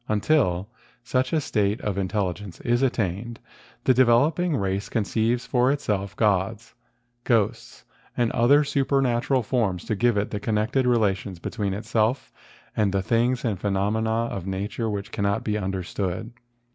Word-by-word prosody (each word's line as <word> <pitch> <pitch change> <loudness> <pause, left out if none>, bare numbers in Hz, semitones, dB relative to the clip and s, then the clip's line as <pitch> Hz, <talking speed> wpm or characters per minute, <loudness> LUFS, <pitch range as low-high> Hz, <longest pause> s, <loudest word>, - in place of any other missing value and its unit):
Until 105 - +2 0.4
such 130 +2 0
a 160 - +2
state 105 -7 0
of 105 -3 -2
intelligence 95 -1 -3
is 120 +1 +1
attained, 115 -2 -1 0.4
the 130 - +4
developing 140 +7 +3
race 100 0 -2
conceives 115 +2 0
for 125 +1 +2
itself 100 -8 -2
gods, 105 +2 0 0.5
ghosts, 115 -1 -1 0.3
and 120 -2 +2
other 140 +6 +4
supernatural 135 -2 +1
forms 105 -7 -1
to 110 - -1
give 120 +1 +2
it 100 - -1
the 105 - -2
connected 115 +5 0
rela¬ 110 -5 +3
tions 95 -1 -8
between 100 +2 -3
itself 110 +4 0 0.4
and 105 -2 +2
the 95 -1 0
things 120 +4 +1
and 105 -6 -1
phenom¬ 100 +1 0
ena 110 0 0 0.2
of 95 -1 -5
nature 100 +4 -3
which 100 -1 -4
cannot 100 +1 -1
be 105 - -1
understood. 95 +1 -3
110 Hz, 145 wpm, -25 LUFS, 100-120 Hz, 0.5 s, the